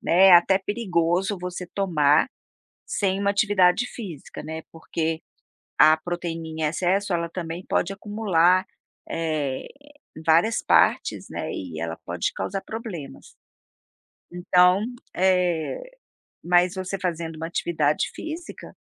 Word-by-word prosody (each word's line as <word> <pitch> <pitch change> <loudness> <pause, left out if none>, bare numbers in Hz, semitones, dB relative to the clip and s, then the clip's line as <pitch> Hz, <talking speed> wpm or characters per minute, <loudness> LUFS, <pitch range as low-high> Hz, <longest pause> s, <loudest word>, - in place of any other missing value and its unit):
Né, 190 +3 +5
até 180 +2 +6
perigoso 190 -2 0
você 180 0 -5
tomar 160 - +3 0.6
sem 195 -1 0
uma 200 - +1
atividade 200 0 +3
física, 185 - -8
né, 160 +1 -6
porque, 160 0 -3 0.6
a 155 0 +8
proteína 165 0 -5
em 160 0 -6
excesso 185 +5 0
ela 170 -1 -1
também 170 0 -5
pode 195 - 0
acumular, 190 -3 +2 0.4
eh, 155 -5 -2 0.6
várias 170 +8 +3
partes, - - +2
né, - - -4
e 85 -4 -6
ela 85 0 -4
pode - - -2
causar 195 - -3
problemas. 210 - -8 1.0
Então, 180 +2 +4 0.3
eh, 180 - +1 0.6
mas 175 +1 +3
você 190 +1 -3
fazendo 165 -3 -3
uma 165 +1 -4
atividade 155 -3 0
física, 320 +2 -8
175 Hz, 115 wpm, -24 LUFS, 160-195 Hz, 1.0 s, a